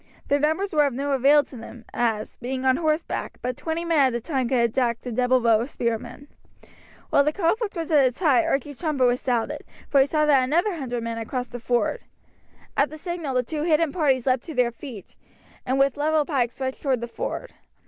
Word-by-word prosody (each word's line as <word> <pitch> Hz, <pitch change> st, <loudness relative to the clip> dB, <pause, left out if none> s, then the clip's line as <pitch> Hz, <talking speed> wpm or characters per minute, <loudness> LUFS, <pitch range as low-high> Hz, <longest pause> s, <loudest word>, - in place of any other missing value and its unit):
Their 285 Hz, -, +3 dB
numbers 320 Hz, +7 st, 0 dB
were 295 Hz, -2 st, +4 dB
of 275 Hz, -, -3 dB
no 280 Hz, +2 st, -2 dB
avail 280 Hz, +2 st, +5 dB
to 265 Hz, -, -14 dB
them, 230 Hz, 0 st, -11 dB
as, 225 Hz, -3 st, -1 dB
being 260 Hz, +1 st, -4 dB
on 260 Hz, 0 st, +4 dB
horseback, 315 Hz, 0 st, -2 dB
but 250 Hz, 0 st, -2 dB
twenty 320 Hz, +4 st, -3 dB
men 330 Hz, -2 st, +2 dB
at 260 Hz, -3 st, +3 dB
a -, -, 0 dB
time 255 Hz, -1 st, -2 dB
could 260 Hz, -, +2 dB
attack 235 Hz, 0 st, 0 dB
the 250 Hz, -, -6 dB
double 250 Hz, +2 st, +2 dB
row 230 Hz, -2 st, +3 dB
of 245 Hz, -, -4 dB
spearmen. 240 Hz, +3 st, -4 dB, 0.8 s
While 285 Hz, -, +5 dB
the 300 Hz, -, +1 dB
conflict 405 Hz, +6 st, 0 dB
was 330 Hz, -1 st, -4 dB
at 295 Hz, -3 st, +6 dB
its 255 Hz, -1 st, +1 dB
height 320 Hz, -2 st, +3 dB
Archie's 285 Hz, -2 st, -2 dB
trumpet 300 Hz, -6 st, +1 dB
was 245 Hz, 0 st, +2 dB
sounded, 240 Hz, -3 st, -1 dB, 0.3 s
for 280 Hz, -, +4 dB
he 270 Hz, -, +3 dB
saw 305 Hz, 0 st, +1 dB
that 280 Hz, -3 st, +4 dB
another 345 Hz, +10 st, +1 dB
hundred 245 Hz, -5 st, -4 dB
men 230 Hz, 0 st, -3 dB
had 225 Hz, -1 st, -5 dB
now -, -, -18 dB
crossed 250 Hz, -2 st, -3 dB
the 245 Hz, -, -6 dB
ford. 240 Hz, -, 0 dB, 0.7 s
At 280 Hz, -, +2 dB
the 310 Hz, -, -9 dB
signal 335 Hz, -5 st, -4 dB
the 250 Hz, -, +2 dB
two 300 Hz, +5 st, -4 dB
hidden 320 Hz, -1 st, +2 dB
parties 275 Hz, -8 st, +1 dB
leapt 255 Hz, -2 st, +1 dB
to 320 Hz, -, -7 dB
their 245 Hz, -1 st, +2 dB
feet, 235 Hz, -, -10 dB, 0.5 s
and 260 Hz, +2 st, +1 dB
with 275 Hz, 0 st, +2 dB
levelled 305 Hz, +1 st, +1 dB
pikes 250 Hz, -5 st, -1 dB
rushed 260 Hz, 0 st, -3 dB
towards 260 Hz, -4 st, 0 dB
the 235 Hz, -, -3 dB
ford. -, -, -5 dB
270 Hz, 225 wpm, -24 LUFS, 245-305 Hz, 0.8 s, at